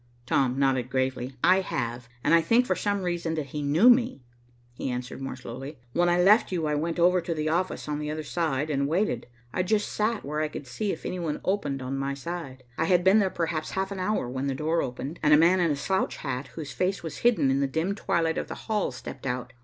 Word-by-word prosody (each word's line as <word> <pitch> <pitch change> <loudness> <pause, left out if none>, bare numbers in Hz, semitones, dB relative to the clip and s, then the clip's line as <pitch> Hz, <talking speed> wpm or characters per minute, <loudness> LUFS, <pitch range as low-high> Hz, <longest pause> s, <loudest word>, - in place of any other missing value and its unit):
Tom 130 0 +1
nodded 130 -3 +1
gravely. 130 0 -1
"I 185 +1 +6
have, 120 -7 -4
and 155 - +3
I 165 - +7
think 230 +9 +3
for - - +1
some 205 -2 -1
reason 170 -2 -1
that 155 -2 -2
he 150 - -2
knew 150 +10 +4
me," 245 - +4 0.5
he 125 - -4
answered 125 +1 -5
more 135 -1 -4
slowly. 130 +4 -8 0.2
"When 175 0 +3
I 175 0 +3
left 205 +5 +5
you 170 -4 -1
I 150 - 0
went 165 +3 -1
over 180 +1 +4
to 170 -1 -3
the 155 0 -1
office 175 +1 -1
on 150 0 -2
the 150 0 -3
other 155 +1 -3
side 155 -2 -1
and 140 -1 +1
waited. 185 +8 0 0.3
I - - -2
sat - - -7
just 215 +1 0
where 150 +2 -2
I 155 - +1
could 150 - -7
see 195 - -2
if - - -7
any 185 - -3
one 160 -3 -2
opened 145 -9 -1
on 135 +2 -3
my 140 0 -2
side. 140 -4 -6 0.2
I 160 - +2
had 180 +1 +3
been 190 +4 +6
there 195 -2 +2
perhaps 160 -3 -2
half 190 +1 -2
an 195 - -4
hour 185 - 0
when 130 +2 -3
the 135 - -1
door 160 +4 0
opened, 135 +6 -5
and 150 0 +6
a - - +6
man 175 +4 +5
in 170 -2 +3
a 145 - +1
slouch 190 +7 -1
hat, 130 -1 -4
whose 155 -3 -6
face 185 +1 -1
was 160 -2 -5
hidden 230 - +3
in 135 - +2
the 140 - +2
dim 160 +8 -1
twilight 165 -5 0
of - - -4
the - - -6
hall, 215 -7 0
stepped 130 +1 -8
out. 125 0 -3
155 Hz, 245 wpm, -27 LUFS, 135-180 Hz, 0.5 s, I